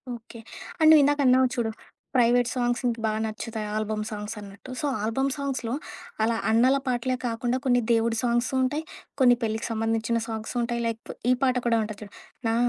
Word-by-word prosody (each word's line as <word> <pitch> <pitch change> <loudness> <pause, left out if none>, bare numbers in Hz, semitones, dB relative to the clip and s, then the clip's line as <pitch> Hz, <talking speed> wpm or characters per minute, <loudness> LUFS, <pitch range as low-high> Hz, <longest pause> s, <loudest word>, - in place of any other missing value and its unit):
Okay. 230 0 -12 0.4
And 315 0 +6
నువ్విందాక 290 -1 +5
అన్నావు 255 0 +5
చూడు, 225 -2 -1 0.4
private 245 0 +4
songs 245 0 0
ఇంక 235 -1 -1
బాగా 215 0 0
నచ్చుతాయి 220 0 -5
ఆల్బమ్ 215 0 -2
సాంగ్స్ 210 +1 -5
అన్నట్టు. 200 +6 -11
సో - - -1 0.2
ఆల్బమ్ 265 +6 0
సాంగ్స్‌లో 265 -4 -3 0.5
అలా 225 0 +1
అన్నల 255 +5 +4
పాటలే 255 +1 0
కాకుండా, 240 +2 -1
కొన్ని 245 -1 +3
దేవుడి 230 0 +2
సాంగ్సు 240 +2 +1
ఉంటాయి, 295 +5 -1 0.4
కొన్ని 245 -1 +7
పెళ్ళికి 220 +1 -1
సంబంధించిన 225 +1 0
సాంగ్సు 220 +2 -5
ఉంటాయి, 235 0 -1
లైక్ 230 0 -5 0.2
ఈ - - +6
పాట 255 -1 +3
కూడా 230 -1 +3
ఉంటది 215 -1 -6
జూడు. 205 - -13 0.3
'నా 225 - +2
235 Hz, 170 wpm, -26 LUFS, 225-255 Hz, 0.5 s, కొన్ని